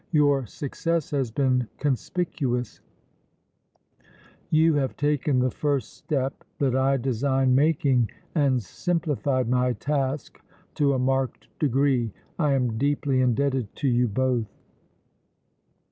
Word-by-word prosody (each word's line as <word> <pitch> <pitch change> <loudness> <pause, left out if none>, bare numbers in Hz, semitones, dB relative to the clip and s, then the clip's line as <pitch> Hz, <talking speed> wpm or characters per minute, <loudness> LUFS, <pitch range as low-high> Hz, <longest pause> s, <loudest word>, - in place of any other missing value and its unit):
Your 145 -5 +3
success 165 +5 -2
has 135 -5 0
been 125 0 +1
conspicuous; 135 - -2 1.7
you 160 +1 +4
have 140 -3 -1
taken 145 -2 +1
the 125 0 +2
first 140 -5 -1
step 135 -2 -3
that 135 -3 +1
I 135 +1 +3
designed 130 +1 +1
making 135 -5 +3 0.2
and 135 -6 +2
simplified 145 - -1
my 125 0 +2
task 140 0 -2 0.3
to 140 -2 +2
a - - +1
marked 130 0 -1
degree. 135 -4 +2 0.3
I 150 -4 +2
am 120 -4 0
deeply 140 -2 +1
indebted 130 -2 0
to 145 - -1
you 125 -1 +3
both." 125 0 0
135 Hz, 115 wpm, -25 LUFS, 125-145 Hz, 1.7 s, you